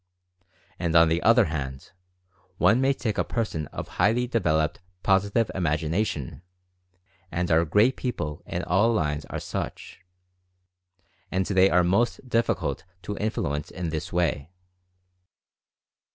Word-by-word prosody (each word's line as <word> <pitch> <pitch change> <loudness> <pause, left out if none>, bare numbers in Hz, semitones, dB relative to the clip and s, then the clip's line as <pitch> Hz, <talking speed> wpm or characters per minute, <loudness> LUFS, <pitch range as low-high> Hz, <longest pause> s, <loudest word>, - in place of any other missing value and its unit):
And 85 -1 -1
on 80 0 +7
the 85 +2 +1
other 115 0 +5
hand, 70 -4 -5 0.7
one 105 +9 +4
may 135 +1 +3
take 115 -6 -2
a - - +3
person 95 - -3
of - - -7
highly 120 +4 +1
developed 80 -10 0 0.2
Positive 100 +3 +2
Imag 80 -4 0
ination 80 - -2 0.4
— 90 +2 -38
and 90 0 -1
our 80 +1 +4
great 105 +10 +3
people 85 - -4
in - - -3
all 105 +7 +3
lines 75 -8 -1
are - - -5
such - - -6 0.6
— 90 0 -43
and 95 0 0
they 95 0 +4
are 90 -1 +4
most 115 +8 +1
difficult 100 - 0 0.2
to 105 +4 -4
influence 75 -9 -2
in 90 -3 -4
this 80 -1 -4
way. 80 -4 0
90 Hz, 140 wpm, -26 LUFS, 80-105 Hz, 0.7 s, on